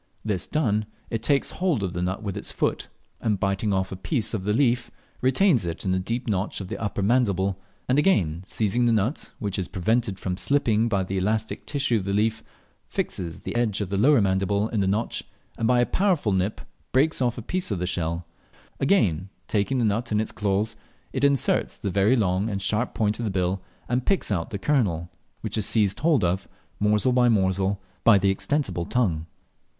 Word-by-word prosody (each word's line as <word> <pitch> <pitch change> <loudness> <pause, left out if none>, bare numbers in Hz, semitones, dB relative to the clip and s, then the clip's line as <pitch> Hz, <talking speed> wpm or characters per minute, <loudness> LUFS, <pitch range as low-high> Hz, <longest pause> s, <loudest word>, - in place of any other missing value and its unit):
This 105 -4 -1
done, 110 -8 0 0.2
it 115 - -1
takes 140 +4 +2
hold 175 - 0
of 90 -2 -2
the 90 - -2
nut 95 +4 -2
with 100 -3 -3
its - - -3
foot, - - -1 0.3
and 105 -4 0
biting 100 +2 0
off 95 -1 0
a - - -3
piece 110 - -1
of 100 -3 -3
leaf 120 +2 +2 0.3
retains 130 - +3
it 85 +1 -4
in 95 - +1
the 95 - +2
deep 115 +7 -3
notch 100 -1 -1
of 95 -2 -6
the - - -4
upper 105 -2 -2
mandible, 100 -4 +2 0.3
and 130 +3 +3
again 90 - +2
seizing 115 +3 +1
the - - +4
nut, 110 +6 0
which 100 -4 -2
is 90 - -2
prevented 105 +2 0
from 90 -1 -3
slipping 115 -3 +2
by 100 -3 +1
the 95 +1 -3
elastic 110 +3 -1
tissue 140 -5 +1
of 95 - -3
the 100 0 0
leaf, 110 +2 +1 0.5
fixes 85 -3 -3
the - - -5
edge 115 -4 +1
of 100 -3 -3
the 100 - -1
lower 135 +4 +5
mandible 100 +2 +1
in 110 - -1
the 95 - +2
notch, 105 +4 -1 0.3
and 115 - 0
by 125 0 +4
a 120 - +4
powerful 180 - +1
nip 95 +2 0 0.3
breaks 140 +3 +2
of 120 -2 +1
a 120 - -6
piece 185 +7 -2
of 100 - -1
the 90 - -2
shell, 85 -1 -2 0.5
again 100 - +2 0.2
taking 105 +5 0
the 120 - +2
nut 115 +3 0
in 105 - +2
its 110 - -1
claws, 105 +2 -1 0.4
it 130 - -2
inserts 140 -2 +2
the 100 - -3
very 100 +6 +3
long 100 -2 +1
and 100 -2 -2
sharp 110 +5 0
point 105 0 0
of 120 - -2
the - - 0
bill 95 0 0 0.3
and 125 +1 -1
picks 195 - +1
out 85 -4 -1
the 100 - -3
kernel, 95 - 0 0.3
which - - -2
is 105 - 0
seized 105 -1 +2
hold 155 - +3
of, 90 +1 0 0.3
morsel 105 +4 +3
by 125 -1 +4
morsel, 95 -2 +1 0.2
by 115 -3 +7
the 100 0 +3
extensible 95 - -1
tongue. 85 -11 0
105 Hz, 205 wpm, -25 LUFS, 95-120 Hz, 0.5 s, by